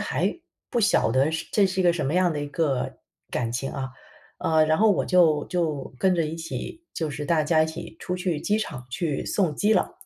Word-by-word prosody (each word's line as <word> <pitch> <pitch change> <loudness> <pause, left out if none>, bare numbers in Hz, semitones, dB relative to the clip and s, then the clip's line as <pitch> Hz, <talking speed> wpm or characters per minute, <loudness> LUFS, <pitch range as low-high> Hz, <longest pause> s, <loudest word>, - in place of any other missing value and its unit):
还 350 - -1 0.3
不 240 - +1
晓 200 - +3
得 135 +4 +3
是 160 0 -3
这 200 -2 +4
是 190 0 -2
一 - - +1
个 175 - +5
什 155 -5 -2
么 150 - -1
样 180 -2 +3
的 150 - -3
一 145 - -3
个 145 -5 -1 0.3
感 115 -2 -1
情 135 +2 -2
啊。 135 -2 -4 0.5
呃， 160 -1 +3
然 155 0 +2
后 220 0 +5
我 195 - +2
就 160 -5 +4
就 155 -7 -2
跟 190 -1 +3
着 165 -3 +1
一 155 - -4
起， 170 - -6
就 160 - -2
是 145 +1 -5
大 155 0 +2
家 155 0 +4
一 - - +1
起 165 +1 -8
出 180 - -3
去 180 -4 -1
机 210 +1 +1
场 145 - -5
去 150 +2 -2
送 175 -7 0
机 210 +8 +2
了。 190 - +1
160 Hz, 250 characters per minute, -25 LUFS, 150-180 Hz, 0.5 s, 个